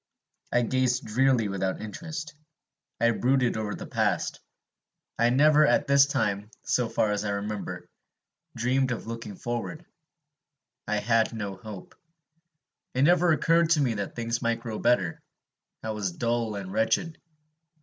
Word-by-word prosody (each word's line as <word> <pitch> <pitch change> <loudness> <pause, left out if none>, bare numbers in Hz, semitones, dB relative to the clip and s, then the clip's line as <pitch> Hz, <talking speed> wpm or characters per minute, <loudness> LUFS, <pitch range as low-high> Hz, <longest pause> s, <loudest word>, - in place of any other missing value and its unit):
I 120 - +3
gazed 125 0 +1
drearily 125 0 +2
without 95 -1 -2
interest. 155 - -6 0.7
I 115 +1 +4
brooded 125 +2 +2
over 110 -1 -3
the - - -7
past; - - -1 0.8
I 120 0 +4
never, 150 +4 +5
at - - +3
this 140 0 +5
time, 105 -6 -1
so 120 -2 +1
far 110 - +1
as 105 0 -1
I 105 - -2
remember, 100 0 -4 0.7
dreamed 130 +2 +1
of 120 - -4
looking 115 -2 -6
forward. 120 - -4 1.0
I 105 +1 0
had 115 +1 +2
no 100 -3 -4
hope. 100 -1 -10 1.0
It 130 - +3
never 175 +2 +5
occurred 165 +1 +3
to 160 -3 +4
me 125 -4 +1
that 100 -2 -4
things 115 0 -2
might 115 -1 0
grow 115 -3 -5
better. 100 -9 +1 0.6
I 110 - -2
was 105 -4 -2
dull 115 +1 -1
and 95 -1 -6
wretched. 155 +9 0
115 Hz, 145 wpm, -27 LUFS, 105-135 Hz, 1.0 s, never